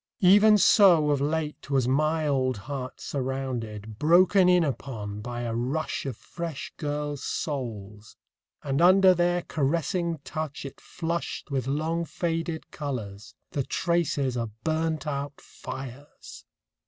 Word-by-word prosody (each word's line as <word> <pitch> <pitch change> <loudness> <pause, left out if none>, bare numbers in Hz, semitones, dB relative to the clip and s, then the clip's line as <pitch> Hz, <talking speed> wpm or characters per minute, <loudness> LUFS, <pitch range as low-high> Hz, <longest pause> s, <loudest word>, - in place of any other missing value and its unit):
Even 205 +3 +7
so 175 -7 +6
of 140 -1 +1
late 150 0 -2
was 135 -3 +2
my 155 +4 +1
old 130 -4 +1
heart 130 +4 -6
surrounded, 120 -6 -4
broken 180 +4 +5
in 180 -1 +5
upon 110 -8 -4
by 120 +1 -5
a 120 -1 -3
rush 135 +6 -2
of 125 -5 -4
fresh 170 -4 -6
girls' 145 -1 -3
souls... 110 -8 -5 0.5
and 140 +2 0
under 185 +1 +7
their 175 0 +1
caressing 165 +3 -1
touch 155 -3 -5
it 135 - -9
flushed 165 -3 -4
with 135 -2 -1
long 160 +4 -1
faded 165 -1 -3
colours, 110 -7 -6 0.2
the 140 - -1
traces 145 -4 0
of 115 -2 -4
burnt 160 -1 -1
out 140 -1 -4
fires 135 +2 -10
145 Hz, 130 wpm, -27 LUFS, 130-165 Hz, 0.5 s, Even